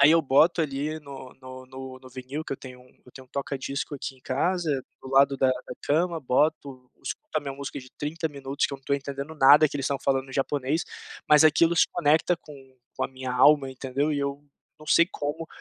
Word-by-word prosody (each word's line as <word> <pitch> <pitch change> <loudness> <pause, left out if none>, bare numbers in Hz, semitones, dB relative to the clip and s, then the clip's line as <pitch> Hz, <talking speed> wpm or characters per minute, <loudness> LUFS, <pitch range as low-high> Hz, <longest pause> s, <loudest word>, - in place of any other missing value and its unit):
aí 140 +2 +8
eu 165 0 +4
boto 155 +5 +4
ali 150 +1 -3
no 135 -3 -10
no 130 0 -10
no 130 0 -9
no 130 - -12
vinil 130 +4 -6
que - - -5
eu - - -3
tenho 125 -1 -11
um 125 - -19 0.2
eu 125 - -17
tenho 130 -1 -12
um - - -39
toca-discos 140 +1 -4
aqui 135 0 -6
em - - -23
casa, 155 0 0 0.2
do - - -9
lado 135 +1 +4
da 135 0 +3
da 130 - -3
cama, 165 +3 +1
boto, 135 -1 0
escuto - - -6
a - - -6
minha 140 -2 -5
música 140 0 -6
de 130 -1 -12
30 160 +3 -2
minutos 140 -1 -3
que - - -10
eu - - -5
não 135 - -32
tô 140 - +1
entendendo 140 +2 -5
nada 150 +1 +7
que 145 - -5
eles 140 - -3
estão 140 -1 -1
falando 135 -1 0
em - - -10
japonês, 145 +3 0 0.4
mas 150 0 +7
aquilo 165 +2 +4
se - - +5
conecta 160 +1 +2
com 150 - -13 0.4
com - - -1
a - - -3
minha 130 -1 -6
alma, 135 +2 +5
entendeu, 135 +3 -2
e 145 - -1
eu 140 0 -3 0.4
não 155 - -14
sei 170 - +5
como, 150 +3 -4
140 Hz, 230 wpm, -26 LUFS, 130-150 Hz, 0.4 s, aí